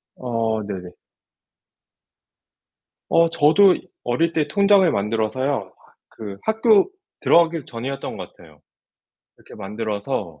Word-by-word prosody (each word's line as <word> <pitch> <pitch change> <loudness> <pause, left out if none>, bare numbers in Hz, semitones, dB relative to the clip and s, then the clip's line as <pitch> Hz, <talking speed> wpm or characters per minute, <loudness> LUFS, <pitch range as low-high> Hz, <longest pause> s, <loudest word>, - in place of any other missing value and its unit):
어 115 -3 -2
네네. 95 -3 -7 2.2
어 165 0 +4
저도 175 +5 +5 0.3
어릴 160 +8 0
때 155 -2 0
통장을 200 -1 +4
만들어서요. 110 +2 -2 0.4
그 100 -3 -9
학교 220 - +3 0.3
들어가기 165 -3 +3
전이었던 130 +2 -6
것 90 -2 -9
같아요. 80 -4 -19 0.8
이렇게 - - -16
만들어서 105 - -4
120 Hz, 225 characters per minute, -21 LUFS, 105-165 Hz, 2.2 s, 저도